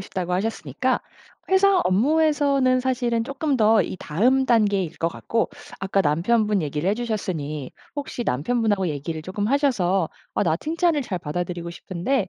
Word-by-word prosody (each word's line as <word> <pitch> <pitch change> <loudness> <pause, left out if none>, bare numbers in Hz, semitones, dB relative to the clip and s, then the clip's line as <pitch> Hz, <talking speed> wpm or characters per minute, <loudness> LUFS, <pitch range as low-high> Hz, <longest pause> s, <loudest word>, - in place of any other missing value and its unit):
싶다고 185 -2 -4
하셨으니까 195 - -1 0.5
회사 380 0 +5
업무에서는 275 +2 +3
사실은 245 -3 0
쪼끔 275 +1 -1
더 220 -1 +5
이 - - -5
다음 250 - +2
단계일 205 -7 +2
것 165 - +1
같고 225 +6 -1 0.3
아까 195 +1 +1
남편분 205 +6 +2
얘기를 150 +4 -2
해주셨으니 180 - -3 0.3
혹시 280 -3 -4
남편분하고 205 - 0
얘기를 155 +2 -4
쪼끔 205 +5 -3
하셔서 195 - +2 0.3
"아 - - +1
나 160 -3 +2
칭찬을 330 - +1
잘 185 -7 -3
받아들이고 170 +2 -4
싶은데 185 +6 -2
210 Hz, 350 characters per minute, -23 LUFS, 175-255 Hz, 0.5 s, 회사